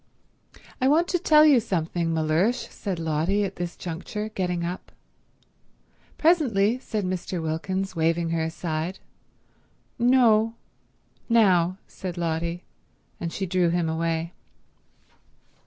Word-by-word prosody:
"I 260 - +3
want 320 +5 +4
to 355 - +1
tell 305 -1 +6
you 285 -5 +6
something, 170 -5 -1
Mellersh," 165 +10 +1
said 195 -4 -4
Lotty 165 +5 0
at 195 -1 -4
this 175 -1 -4
juncture, 190 +5 -5
getting 180 -4 -2
up. 180 +2 -6 1.3
"Presently," 255 - +3
said 215 -6 -3
Mr. 185 0 -3
Wilkins, 185 +4 -3
waving 165 +1 +1
her 165 -1 0
aside. 160 +2 -3 1.0
"No—now," 225 -5 +1
said 185 -2 -7
Lotty; 170 +1 -2 0.6
and 170 - -3
she 195 - -3
drew 180 -1 +1
him 170 -1 0
away. 165 +1 -2
180 Hz, 110 wpm, -25 LUFS, 165-215 Hz, 1.3 s, tell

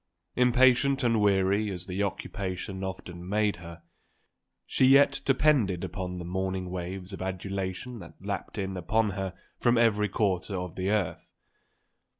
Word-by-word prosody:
Impatient 125 +2 +4
and 115 -3 +3
weary 100 +1 +2
as 90 -2 -5
the 95 +1 -3
occupation 95 -1 -4
often 90 -1 -6
made 105 -1 +1
her, 85 0 -11 0.8
she 130 - +2
yet 140 +1 +5
depended 130 - +3
upon 90 0 -4
the 85 - -6
morning 95 0 -2
waves 90 +1 -5
of 95 - -7
adulation 95 +5 -4
that 85 -3 -11
lapped 100 +2 -5
in 95 -1 -3
upon 105 +5 +1
her 95 -1 -4 0.2
from 120 -1 +3
every 105 -3 +3
quarter 95 -1 0
of 90 -2 -5
the 95 +1 -1
earth. 105 -5 -1
95 Hz, 145 wpm, -28 LUFS, 90-110 Hz, 0.8 s, yet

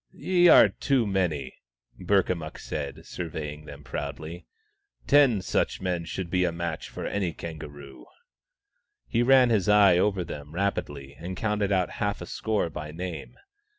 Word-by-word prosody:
" - - -49 0.2
Ye 175 -1 +6
are - - +9
too 135 -5 0
many," 90 -9 -1 0.5
Burkamukk 90 -4 0
said, 70 -2 -6
surveying 75 -3 -6
them 75 -1 -11
proudly. 80 +4 -6 0.3
" - - -51 0.3
Ten 135 -9 +4
such - - 0
men 90 -3 -2
should 85 0 -5
be 90 -1 +2
a 90 - +1
match 85 -1 -4
for - - -6
any 95 -5 -1
kangaroo," 70 -5 -9 1.0
He 115 - +1
ran 125 -1 +5
his 105 -4 +2
eye 100 -4 +6
over 95 -2 +1
them 75 -1 -8
rapidly 75 -8 -3
and 90 +2 -6
counted 105 -2 0
out 95 -2 +1
half 100 -1 0
a - - -6
score 105 -6 -2
by 75 0 -6
name. 85 +1 -6
90 Hz, 155 wpm, -27 LUFS, 80-100 Hz, 1.0 s, are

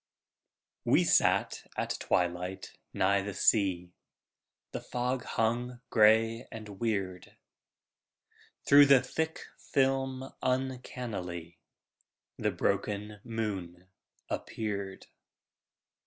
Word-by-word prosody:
We - - +4
sat - - +2
at - - -1
twilight 90 +1 -1 0.2
nigh 100 +1 +2
the 100 -1 -5
sea, 90 -4 +2 0.8
The - - -4
fog 125 +1 -2
hung 120 +2 -1
gray 115 +2 +4
and 105 -3 -9
weird. 95 -5 -3 1.3
Through 145 0 +8
the 135 -2 +6
thick 160 +4 -2 0.3
film 135 -1 +1
uncannily 120 -10 -3 0.8
The - - +1
broken 105 0 -2
moon 95 -6 -4 0.4
appeared. 100 -3 -4
110 Hz, 80 wpm, -30 LUFS, 95-125 Hz, 1.3 s, Through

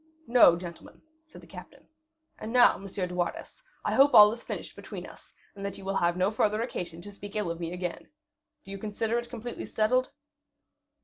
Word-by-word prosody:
"No, 235 - +6
gentlemen," 170 -1 -10 0.3
said 305 - -14
the - - -15
captain. - - -13 0.5
"And 220 - -6
now, 245 0 +6
M. 195 - -9
de 180 -2 -4
Wardes, 180 - -4 0.2
I - - 0
hope 280 +1 +5
all 210 0 +10
is 235 +1 -6
finished - - -7
between - - -8
us, - - -15 0.2
and 200 - -9
that 200 -1 -4
you 195 - -11
will 195 0 -1
have 175 +1 +1
no 185 +3 +2
further 215 0 +1
occasion 170 -7 -6
to 205 - -9
speak 200 +1 -11
ill 210 -5 -1
of 170 - -6
me 170 -1 -4
again. 180 -1 -5 0.6
Do 195 - -10
you 195 - -6
consider 220 +3 -1
it 240 0 -8
completely 240 0 -7
settled?" 255 +4 +1
205 Hz, 200 wpm, -28 LUFS, 180-230 Hz, 0.6 s, all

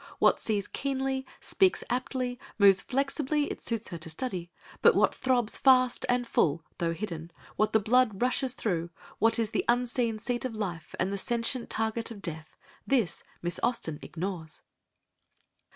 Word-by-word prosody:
What - - +4
sees 205 -3 -1
keenly, 265 -1 -2
speaks 380 -2 +2
aptly, 250 0 -2 0.2
moves 200 -2 +7
flexibly, 280 +2 0
it - - -7
suits 230 -2 +1
her 170 - -6
to 160 - -7
study; 175 -1 -4 0.3
but - - +6
what - - +3
throbs 245 -4 +1
fast 255 -2 +4
and 245 0 +2
full, 165 -7 +1 0.2
though 170 -2 +1
hidden, 165 -3 -5 0.3
what 215 - +1
the 220 - +4
blood 220 -1 +2
rushes 255 +1 +1
through, 175 -9 -2 0.3
what 225 +1 +4
is 225 -2 0
the - - 0
unseen 240 -1 +1
seat 240 +2 -2
of 255 -3 -3
life, 180 -7 -5
and 190 +2 0
the 200 - -2
sentient 235 +2 -2
target 225 +1 -1
of 225 -3 -8
death, 160 -2 -5 0.3
this 235 - +1 0.2
Miss 175 0 -1
Austen 200 -11 -1
ignores." 170 -2 -6
230 Hz, 160 wpm, -29 LUFS, 185-255 Hz, 0.3 s, moves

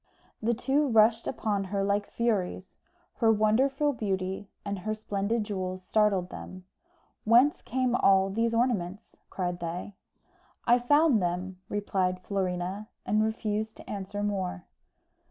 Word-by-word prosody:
The 230 +2 +1
two 280 +5 +1
rushed 225 -1 +4
upon 205 -3 -1
her 195 +1 -1
like 205 +1 0
furies. 200 -5 -2 0.4
Her 225 -2 +4
wonderful 265 +7 +2
beauty 195 -3 -3 0.2
and 200 -1 -3
her 215 +4 -2
splendid 215 +1 -1
jewels 185 -3 -4
startled 200 -3 +2
them. 185 0 -9 0.6
"Whence 240 +6 +5
came 255 0 0
all 195 -3 +4
these 230 +3 0
ornaments?" 210 -5 -1
cried 180 -2 -3
they. 175 +4 -5 0.7
"I 240 +1 +5
found 290 -1 +4
them," 180 +1 -2
replied 190 -3 -1
Florina, 190 +1 -2 0.2
and 215 +1 +2
refused 220 0 -2
to - - -13
answer 205 0 -4
more. 190 -3 -2
205 Hz, 130 wpm, -28 LUFS, 190-230 Hz, 0.7 s, Whence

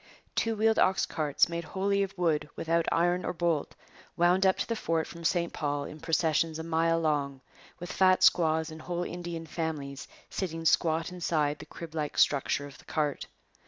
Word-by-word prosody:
Two 225 -1 0
wheeled 220 +1 +3
ox 190 +1 +3
carts, 150 -3 +1
made 170 0 -4
wholly 200 +3 0
of 195 0 -3
wood, 160 -4 +1
without 165 0 0
iron 175 +2 +2
or - - -2
bolt, 170 -3 -1 0.4
wound 180 +3 +4
up 190 - +3
to - - -1
the 230 - -1
fort 165 -6 -1
from 170 0 -10
St 170 0 0
Paul 145 -1 -2
in 155 - -8
processions 160 -1 +1
a 160 - -5
mile 165 0 +1
long, 145 -4 0 0.4
with 175 +1 -6
fat 185 0 +4
squaws 160 -1 +4
and 155 0 -9
whole 175 +1 -3
Indian 175 -2 -5
families 155 -3 -4 0.2
sitting 165 -3 -4
squat 165 +1 +2
inside 155 -4 0
the 155 - -10
crib 165 0 -9
like 150 -2 -3
structure 145 0 +2
of 140 -3 -12
the - - -18
cart. 150 -3 -2
165 Hz, 185 wpm, -29 LUFS, 155-175 Hz, 0.4 s, wound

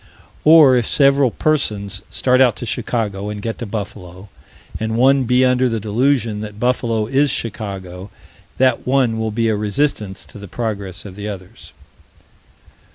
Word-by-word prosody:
Or, 155 -4 +7
if 120 -3 +1
several 140 -2 +4
persons 110 -8 -1
start 130 0 +2
out 125 -5 +4
to - - -6
Chicago, 105 -4 -3
and 105 0 -5
get 115 +2 -5
to 120 - -5
Buffalo, 100 -2 -7 0.5
and 110 +1 -2
one 135 +1 +4
be 125 +2 +3
under 125 0 +2
the 115 -1 -2
delusion 115 +1 0
that 105 -1 -8
Buffalo 115 -3 0
is 135 +5 +2
Chicago, 95 -6 -5 0.5
that 130 -2 +1
one 125 -4 +2
will 110 0 -1
be 115 +1 -1
a 110 - +1
resistance 105 -2 -2
to - - -12
the 100 - -9
progress 100 -4 -5
of 95 -2 -9
the 105 +1 -6
others. 95 -3 -10
115 Hz, 160 wpm, -19 LUFS, 105-130 Hz, 0.5 s, Or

